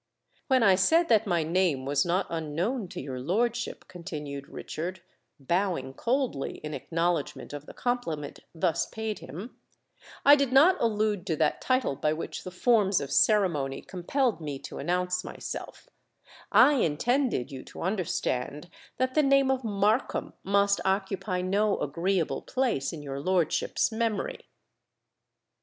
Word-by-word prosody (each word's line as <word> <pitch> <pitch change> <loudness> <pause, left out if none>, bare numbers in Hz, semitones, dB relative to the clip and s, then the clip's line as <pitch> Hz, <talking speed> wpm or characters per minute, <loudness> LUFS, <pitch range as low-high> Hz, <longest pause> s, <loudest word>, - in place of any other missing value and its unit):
"When 260 -3 +4
I 195 -3 +6
said 320 - +3
that 220 -1 +4
my 170 -3 +2
name 165 -5 +1
was 140 +1 +1
not 185 +3 +1
unknown 170 - -2
to - - -7
your 130 -2 -5
lordship," 230 - -1
continued 150 -5 -7
Richard, 175 +2 -6 0.4
bowing 170 -3 -1
coldly 240 - -1
in 150 0 -5
acknowledgment 165 -2 -2
of 145 0 -7
the - - -10
compliment 165 - -3 0.2
thus 165 0 +1
paid 220 -1 -4
him, 180 - -9 0.7
"I 285 +1 +10
did 280 -3 0
not 305 +8 +6
allude 210 -4 0
to 165 - +1
that 155 0 +1
title 255 - +1
by 150 +3 0
which 160 - -5
the - - -6
forms 200 0 +3
of 140 -1 -5
ceremony 155 -10 +2
compelled 210 +4 -1
me 145 -3 -4
to - - -7
announce 180 +3 0
myself: - - -7 0.6
I 290 -1 +6
intended 235 - +1
you 130 -1 -7
to - - -8
understand 170 -5 -2 0.3
that 255 0 0
the 305 - +4
name 275 -1 +4
of 260 -1 -1
Markham 210 +2 0
must 200 +1 +2
occupy 190 -1 -1
no 200 +3 +1
agreeable 170 +4 -1
place 240 - -1
in 155 -3 -8
your 140 -1 -5
lordship's 175 +4 +1
memory." 230 - -2
185 Hz, 145 wpm, -28 LUFS, 155-230 Hz, 0.7 s, I